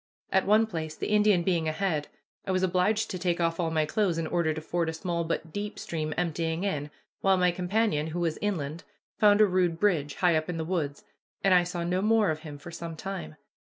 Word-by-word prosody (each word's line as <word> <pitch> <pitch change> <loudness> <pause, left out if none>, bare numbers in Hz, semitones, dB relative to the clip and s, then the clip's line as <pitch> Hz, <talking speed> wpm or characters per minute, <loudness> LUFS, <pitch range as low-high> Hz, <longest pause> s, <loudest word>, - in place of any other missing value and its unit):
At 190 - +2
one 215 +2 +5
place, 160 -7 -5
the - - -4
Indian 210 -4 +4
being 170 -3 +1
ahead, 155 -2 -1 0.4
I - - -4
was 185 0 +1
obliged 185 +4 +1
to 185 - -4
take 175 -1 0
off 165 0 0
all 170 -2 +1
my 160 -1 +1
clothes 185 0 0
in 165 - -1
order 165 0 +1
to 155 - -3
ford 165 +1 -1
a - - -3
small 170 +1 -2
but 165 -1 -3
deep 205 0 -4
stream 155 -2 -3
emptying 165 0 -1
in, 150 -7 -2 0.3
while 195 -1 +3
my 180 -1 +3
companion, 180 -3 0
who 165 +2 -4
was 165 -2 -1
inland, 165 -5 -2 0.4
found 205 0 +6
a - - +8
rude 180 -4 +1
bridge, 160 -8 +1
high 175 -3 +3
up 155 +2 -1
in 175 - -2
the 160 - -2
woods, 155 -5 -2 0.4
and 195 - +5
I 180 -1 +6
saw 175 0 -4
no 180 +2 0
more 215 -3 +3
of 155 - -3
him 150 -2 -9
for 145 +4 -10
some 165 -1 -6
time. 155 - -6
175 Hz, 225 wpm, -28 LUFS, 160-190 Hz, 0.4 s, a